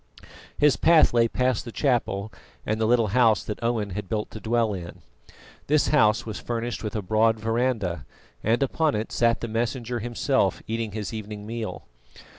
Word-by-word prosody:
His 150 -1 +4
path 165 -5 +5
lay 115 -1 +4
past 125 -1 0
the 120 - -8
chapel 110 -6 -1 0.3
and 110 +1 -1
the 110 - +2
little 115 -2 +3
house 115 -1 +3
that 105 - -6
Owen 115 -4 -1
had 95 0 -5
built 105 -1 -2
to 110 - -8
dwell 115 -1 +1
in. 85 -3 -8 0.6
This 150 +1 +3
house 110 -7 +3
was 110 -2 -5
furnished 120 0 -4
with 105 -1 -4
a 105 - -2
broad 110 +3 +2
verandah, 110 - -1 0.4
and 115 +5 +2
upon 150 +2 +1
it 110 +1 -3
sat 115 0 +2
the 115 - -3
Messenger 120 +2 -2
himself, 120 -2 0
eating 115 -2 -3
his 110 0 -4
evening 105 -1 -6
meal. 115 0 -5
115 Hz, 175 wpm, -25 LUFS, 105-120 Hz, 0.6 s, path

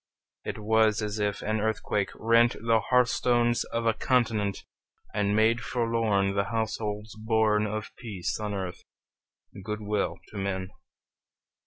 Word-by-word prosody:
It - - -4
was 110 0 +2
as 105 0 -3
if 105 -1 -1
an 110 0 0
earthquake 105 -2 0
rent 115 +1 +4
The 115 0 +3
hearth 125 -1 +5
stones 120 0 +2
of 115 0 -3
a 115 - +4
continent, 110 -6 0 0.5
And 105 0 +1
made 115 +2 +3
forlorn 115 -4 +1
The 100 0 +1
households 110 -1 -3
born 110 -1 +2
Of 110 +1 -5
peace 105 -7 -4
on 105 -1 -3
earth, 95 -2 -5 0.8
good 105 +1 -4
will 105 -1 -1
to 105 - -9
men! 95 -1 -3
110 Hz, 140 wpm, -28 LUFS, 105-115 Hz, 0.8 s, hearth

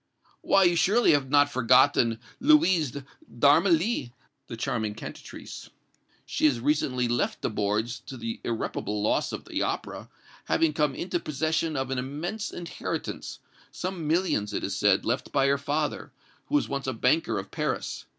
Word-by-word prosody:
"Why, 195 0 +4
you 175 -1 +4
surely 200 +8 +4
have 140 -3 +1
not 145 0 +4
forgotten 125 -2 +4 0.2
Louise 190 - +3 0.4
d'Armilly, 235 - +3 0.4
the 115 - -7
charming 115 -4 -2
cantatrice! - - -9 0.6
She - - -1
has 135 -6 +3
recently 130 -2 0
left 120 0 -1
the - - 0
boards, 110 +3 -1
to 135 - -7
the 115 -1 -5
irreparable 105 -2 -3
loss - - +1
of - - -6
the - - -3
opera, - - -3 0.4
having 160 -2 +2
come 150 -3 +1
into 175 0 -2
possession 160 +1 -1
of 135 -1 -2
an 130 - -1
immense 155 +11 -4
inheritance 175 -1 -5 0.3
some 180 -4 -4
millions, 155 - 0
it - - -2
is 95 - -2
said, 100 -1 +3
left 125 +3 -2
by 135 -2 +2
her 140 0 +2
father, 145 +2 -2 0.4
who 295 - -1
was 295 - +2
once 140 -1 -4
a 130 - -1
banker 125 -1 +1
of 95 0 -6
Paris. - - -3
140 Hz, 160 wpm, -27 LUFS, 115-165 Hz, 0.6 s, Why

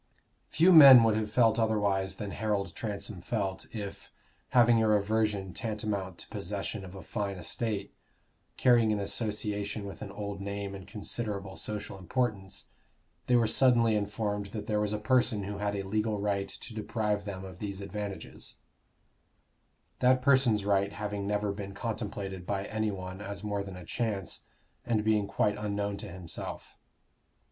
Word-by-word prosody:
Few 180 +3 +5
men 135 -7 +11
would 110 -2 +3
have 110 -1 -1
felt 115 0 +4
otherwise 100 -4 +1
than 100 0 -5
Harold 100 -4 -1
Transome 105 -3 -4
felt, 95 0 -2
if, 100 -3 -7 0.4
having 120 -2 +5
a 110 - +3
reversion 105 -2 +1
tantamount 105 -5 -3
to - - -9
possession 100 0 -4
of 95 0 -10
a 95 - -8
fine 100 -3 -3
estate, 100 +2 -3 0.6
carrying 120 -3 +5
an 105 - 0
association 105 0 -2
with 100 - -8
an 100 - -5
old 100 -1 -5
name 100 0 -4
and 95 -1 -9
considerable 100 -2 -4
social 105 -2 -5
importance, 95 0 -2 0.6
they 125 - +4
were 120 -1 +5
suddenly 115 -1 +4
informed 105 0 -2
that 105 +1 -6
there 105 -1 0
was 105 -1 0
a 105 - 0
person 115 -1 +2
who 100 +1 -5
had 100 0 -1
a 100 - -2
legal 105 +2 -1
right 100 -1 -1
to 120 - -8
deprive 105 -1 -1
them 95 -2 -5
of 95 -1 -10
these 100 -2 -4
advantages; 100 0 -6 1.4
that 130 0 +4
person's 130 -7 +4
right 100 0 +2
having 100 0 -3
never 105 0 0
been 100 -1 -6
contemplated 100 -4 -4
by 100 0 -1
any 110 0 -1
one 95 -1 -6
as 100 0 -6
more 100 -1 -2
than 95 -2 -8
a 90 - -10
chance, 100 -3 -3 0.4
and 110 -3 0
being 105 -2 +2
quite 105 +1 +1
unknown 100 -1 -2
to 100 - -7
himself. 85 -2 -7
105 Hz, 160 wpm, -30 LUFS, 100-110 Hz, 1.4 s, men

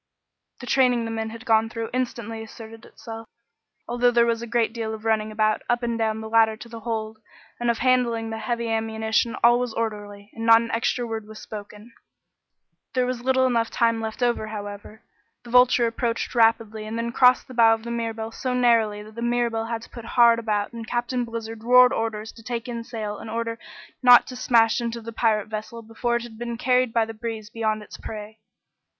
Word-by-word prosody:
The - - -7
training 245 -2 +3
the 225 - -4
men 220 0 -3
had 230 +2 -10
gone 225 -1 +3
through 230 -1 -5
instantly 235 -3 -3
asserted 225 +1 -11
itself. 225 -1 -10 0.6
Although 245 +1 +2
there 235 -1 +4
was 230 -1 0
a 235 - -6
great 230 -1 +1
deal 220 -2 -3
of 220 0 -12
running 220 -1 +1
about, 215 0 +1
up 240 0 +1
and 235 -1 -1
down 220 -1 -1
the 220 - -6
ladder 220 -1 +3
to 235 - -10
the 230 -1 -9
hold, 220 -1 -4 0.4
and 240 0 0
of 235 - +1
handing 245 -3 +2
up 225 - -5
the 220 - -4
heavy 235 0 -2
ammunition, 220 +1 0
all 240 +1 +6
was 245 -2 -3
orderly, 205 -2 -5
and 225 - -7
not 230 0 +7
an 230 0 -4
extra 235 +2 0
word 225 -2 -5
was 215 0 -11
spoken. 210 +2 -10 1.0
There 255 -1 +2
was 250 -1 -3
little 260 +1 +2
enough 235 -3 +1
time 230 -1 +1
left 220 +3 -4
over, 240 -3 0
however. 205 +1 -8 0.4
The 240 - -11
Vulture 250 -1 +5
approached 230 0 -2
rapidly 225 -2 +2
and 220 +1 -4
then 230 0 -2
crossed 250 +1 +4
the 260 - -10
bow 225 -2 +5
of 220 - -12
the 235 - -5
Mirabelle 225 -1 -3
so 250 +2 -3
narrowly 225 -4 +2
that 215 +1 -13
the 235 - -7
Mirabelle 235 -1 0
had 230 0 -4
to - - -13
put 235 - -9
hard 235 -1 +6
about 210 -1 -2
and 230 -1 -7
Captain 245 +1 -1
Blizzard 225 -1 -7
roared 250 +1 +6
orders 220 -1 -3
to 230 - -15
take 235 +1 -4
in 235 -1 -5
sail 220 -3 -5
in - - -8
order 230 0 -3 0.4
not 245 -2 +8
to 255 - -8
smash 235 -1 +3
into 235 0 -3
the 230 0 -8
pirate 220 -2 +1
vessel 220 +2 -6
before 225 +2 -2
it 235 - -1
had 225 -2 -11
been 235 -1 -4
carried 250 0 +2
by 225 -1 +2
the 225 - -8
breeze 225 -1 -6
beyond 215 -2 -1
its - - -11
prey. 215 0 -8
230 Hz, 215 wpm, -24 LUFS, 220-240 Hz, 1.0 s, not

